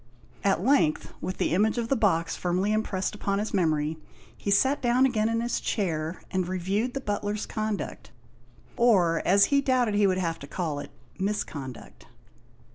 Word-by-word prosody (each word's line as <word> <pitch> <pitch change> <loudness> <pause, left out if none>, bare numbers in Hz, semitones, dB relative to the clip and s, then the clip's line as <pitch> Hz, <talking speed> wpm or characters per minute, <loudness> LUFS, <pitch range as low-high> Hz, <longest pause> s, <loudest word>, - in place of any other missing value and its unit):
At 195 -3 +2
length, 260 - +2
with 185 - -4
the - - 0
image 215 +6 +2
of 230 -1 -2
the 275 - +3
box 165 -8 +1
firmly 185 +4 0
impressed 205 -3 -1
upon 200 -1 -1
his 210 +2 -3
memory, 160 -4 +1 0.4
he - - -5
sat 265 +8 +3
down 245 +2 +3
again 225 -4 +1
in 230 0 0
his 240 0 -1
chair, 165 -5 -2
and 185 -2 0
reviewed 195 +7 -1
the - - -1
butler's 205 -1 -2
conduct, 215 - -4 0.7
or 185 -9 +4
as 200 +2 +6
he 280 - +5
doubted 255 -5 +2
he 205 -1 +4
would 185 -1 +1
have 165 -3 -2
to 140 - -9
call 155 -3 -3
it, - - -7 0.3
misconduct. 160 - -4
200 Hz, 170 wpm, -27 LUFS, 175-220 Hz, 0.7 s, as